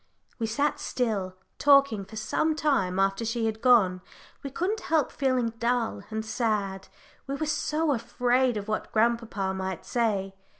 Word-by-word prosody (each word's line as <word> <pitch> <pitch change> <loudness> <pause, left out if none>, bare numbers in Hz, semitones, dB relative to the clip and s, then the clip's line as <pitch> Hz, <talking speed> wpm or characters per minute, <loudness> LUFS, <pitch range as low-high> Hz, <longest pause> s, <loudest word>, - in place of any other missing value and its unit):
We 225 - -1
sat 280 +6 0
still, 200 -7 -2 0.2
talking, 275 -8 +4
for 220 - -12
some 310 +8 0
time 200 -13 +1
after 195 +3 +1
she 225 0 -1
had 220 0 -2
gone 210 -8 +4 0.4
we 275 - -5
couldn't 370 +10 -1
help 315 -8 +1
feeling 255 -4 +1
dull 235 -1 0
and 220 0 -4
sad. 210 -4 -1 0.4
We 275 - -2
were 310 - -2
so 310 0 0
afraid 245 0 +1
of 205 0 -5
what 215 - -3
grandpapa 220 -4 0
might 190 -2 -4
say. 205 -5 0
230 Hz, 155 wpm, -27 LUFS, 200-265 Hz, 0.4 s, talking